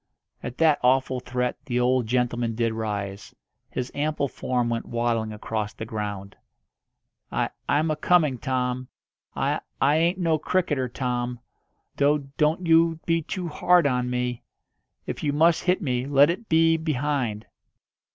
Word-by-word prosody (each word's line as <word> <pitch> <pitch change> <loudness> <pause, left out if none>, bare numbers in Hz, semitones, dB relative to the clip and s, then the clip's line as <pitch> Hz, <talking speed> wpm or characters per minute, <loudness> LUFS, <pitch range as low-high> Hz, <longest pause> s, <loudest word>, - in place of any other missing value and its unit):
At 125 - -6
that 160 -3 +4
awful 130 0 +2
threat 125 0 -2
the 125 -2 0
old 125 -1 +2
gentleman 120 -1 0
did 115 -1 0
rise. 100 -3 -4 0.3
His 125 0 -4
ample 145 -1 -1
form 125 -2 -1
went 115 -1 -2
waddling 115 -2 -1
across 105 0 -4
the 110 - -7
ground. 105 -2 -5 1.0
"I - - -1 0.2
I'm 155 +2 +2
a - - 0
coming, 155 -5 +2
Tom. 125 0 -2 0.5
I - - 0 0.2
I 145 +3 +4
ain't 170 +3 +2
no 165 -4 +1
cricketer, 150 -7 0
Tom. 125 -1 -2 0.6
Do 145 0 +2
don't 160 +4 +1
you 165 0 +4
be 165 0 +2
too 180 +3 -4
hard 175 +2 +3
on 125 -2 +1
me. 125 -1 -2 0.6
If - - -5
you 145 -1 0
must 165 +3 +3
hit 180 +2 +2
me, 125 -2 -1
let 145 +2 +5
it 220 +6 -7
be 165 0 +4
behind." 140 -8 -1
130 Hz, 150 wpm, -25 LUFS, 120-155 Hz, 1.0 s, let